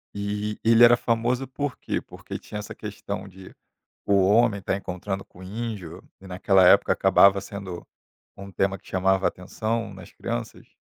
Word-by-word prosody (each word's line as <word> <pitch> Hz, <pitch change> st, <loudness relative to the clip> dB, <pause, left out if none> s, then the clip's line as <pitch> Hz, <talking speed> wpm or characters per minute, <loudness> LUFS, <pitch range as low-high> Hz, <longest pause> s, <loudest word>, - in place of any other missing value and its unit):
Eh, 105 Hz, +1 st, -3 dB
ele 115 Hz, +1 st, +6 dB
era 120 Hz, 0 st, +8 dB
famoso 120 Hz, +3 st, 0 dB
por 140 Hz, +1 st, -4 dB
quê? -, -, -3 dB
Porque -, -, -9 dB
tinha 105 Hz, -, -7 dB
essa 105 Hz, -, -7 dB
questão 100 Hz, -1 st, -6 dB
de 95 Hz, 0 st, -13 dB, 0.5 s
o 100 Hz, -, +2 dB
homem 105 Hz, -1 st, +3 dB
estar 95 Hz, -, -1 dB
encontrando 95 Hz, +1 st, -5 dB
com 90 Hz, -, -18 dB
o -, -, -11 dB
índio 105 Hz, -5 st, -6 dB, 0.2 s
e 95 Hz, -, -13 dB
naquela 95 Hz, 0 st, +3 dB
época -, -, +6 dB
acabava 100 Hz, 0 st, +5 dB
sendo 95 Hz, -4 st, -8 dB, 0.5 s
um 100 Hz, 0 st, -10 dB
tema 95 Hz, +1 st, 0 dB
que -, -, -20 dB
chamava 95 Hz, 0 st, +1 dB
atenção 110 Hz, +3 st, -4 dB
nas 95 Hz, -2 st, -13 dB
crianças. -, -, -6 dB
100 Hz, 165 wpm, -25 LUFS, 95-110 Hz, 0.5 s, era